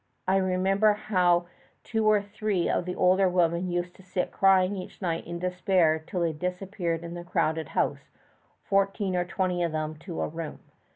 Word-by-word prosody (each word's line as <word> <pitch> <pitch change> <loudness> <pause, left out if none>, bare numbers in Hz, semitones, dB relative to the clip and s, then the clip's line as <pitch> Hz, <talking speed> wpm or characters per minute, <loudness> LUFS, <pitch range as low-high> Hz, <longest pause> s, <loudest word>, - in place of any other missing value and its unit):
I 190 +1 +4
remember 195 +3 +3
how 180 -4 +2 0.4
two 220 -1 0
or 210 -1 +4
three 205 -3 -1
of - - 0
the 180 - -4
older 185 +1 +4
women 175 0 +1
used 175 0 -2
to - - -15
sit 185 0 -2
crying 195 0 +4
each 185 - -8
night 170 -4 -2
in 170 0 -4
despair 180 -2 +2
till 180 - -2
they 165 -2 +1
disappeared 180 0 -3
in 170 0 -6
the 175 0 -6
crowded 160 -2 0
house, - - 0 0.5
fourteen 195 -1 +1
or 175 0 +1
{xiii} - - -18
twenty 180 -1 0
of 170 -2 -1
them 155 0 -2
to 170 0 -5
a - - 0
room. 165 -1 -6
180 Hz, 185 wpm, -27 LUFS, 170-195 Hz, 0.5 s, I